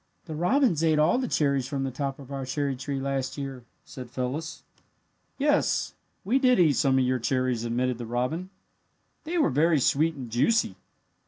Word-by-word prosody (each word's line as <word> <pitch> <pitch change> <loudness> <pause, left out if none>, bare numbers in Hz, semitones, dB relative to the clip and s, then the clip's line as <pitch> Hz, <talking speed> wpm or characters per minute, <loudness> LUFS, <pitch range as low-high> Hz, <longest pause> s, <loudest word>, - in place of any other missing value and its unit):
"The 160 - -6
robins 180 - +2
ate 160 -2 +3
all 155 +10 +3
the 255 - -1
cherries 140 - +1
from 140 -1 -3
the 135 - -2
top 135 +1 -3
of 140 -1 -12
our 135 -1 -4
cherry 135 +1 -2
tree 135 +2 -4
last 135 0 -2
year," 135 -3 -6 0.2
said 125 -2 -9
Phyllis. 135 +6 -4 0.7
"Yes, 290 +1 +1 0.3
we 245 +7 +2
did 250 -4 +4
eat 160 -5 +5
some 135 -1 +2
of 130 - +3
your 130 0 +1
cherries," 125 -1 0
admitted 125 +1 -1
the 120 - -6
robin. 125 +10 -2 0.8
"They 340 +3 -2
were 315 - +3
very 155 +3 +3
sweet 155 +5 +2
and 130 -3 -7
juicy. 125 - +2
140 Hz, 180 wpm, -27 LUFS, 130-165 Hz, 0.8 s, eat